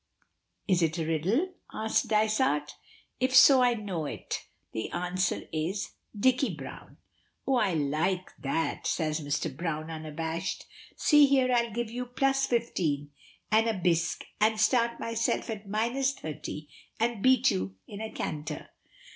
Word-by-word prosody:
"Is 185 -4 +3
it 160 0 +1
a 165 - -1
riddle?" 195 - 0 0.2
asks 220 0 +1
Dysart. 215 - +2 0.5
"If 255 +1 +1
so 265 0 +9
I 245 -1 +4
know 190 -8 -3
it. - - -5 0.2
The 110 - -3
answer 180 +1 -1
is 165 +6 -2 0.3
Dicky 260 +4 +2
Browne." - - -10 0.5
"Oh, 270 -2 +2
I 200 -7 +2
like 160 +6 0
that!" 160 +3 -2
says 155 -1 0
Mr. 145 0 -2
Browne 160 0 -3
unabashed. 160 +2 -4 0.3
"See 295 -2 +6
here, 265 -2 +3
I'll 235 -1 +2
give 235 +1 -3
you 250 +1 -4
plus 270 +2 +1
fifteen, 160 - -1 0.4
and 220 +1 +4
a 225 - 0
bisque, 170 -3 0
and 215 +1 +3
start 235 +2 +2
myself 230 0 -1
at 205 -2 -7
minus 240 +6 +1
thirty, 150 - -7 0.3
and 230 -2 0
beat 260 +1 +5
you 95 0 -3
in 205 +1 -8
a 220 - -4
canter." 150 -1 -5
205 Hz, 145 wpm, -29 LUFS, 160-240 Hz, 0.5 s, so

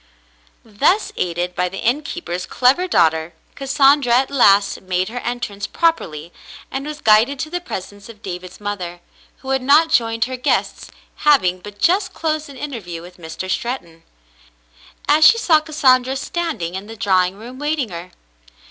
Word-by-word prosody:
Thus, 280 - +1
aided 175 0 -2
by 180 0 -1
the 195 - -8
innkeeper's 220 - -2
clever 270 +9 +2
daughter, 160 - +2 0.2
Cas 275 -1 -7
sandra 275 -2 +4
at 265 +2 +2
last 200 -7 +4
made 185 +1 -1
her 245 +2 -5
entrance 240 -5 -4
properly 170 - -1 0.4
and 270 +2 -4
was 300 0 -7
guided 220 +6 +4
to 310 +3 -5
the 355 0 -3
presence 205 - -8
of 215 -2 -14
David's 180 -1 -7
mother, 185 -4 -5 0.4
who 265 - -4
had 265 -1 +1
not 295 +5 +4
joined 225 -1 +2
her 255 0 -5
guests, 250 - -1 0.3
having 185 -12 +3
but 205 +2 -11
just 375 - +1
closed 310 -2 -2
an 275 - -11
interview 210 - -6
with 180 +1 -13
Mr. 165 +2 -7
Stret 240 +7 -2
ton. 165 -1 -20 1.1
As 305 +2 +4
she 460 - +8
saw 330 -8 +4
Cassandra 265 -4 +2
standing 275 - -3
in 190 +2 -6
the 225 - -9
drawing 190 -3 +2
room 245 +4 -10
waiting 295 -4 -1
her. 175 0 -8
235 Hz, 165 wpm, -19 LUFS, 185-285 Hz, 1.1 s, she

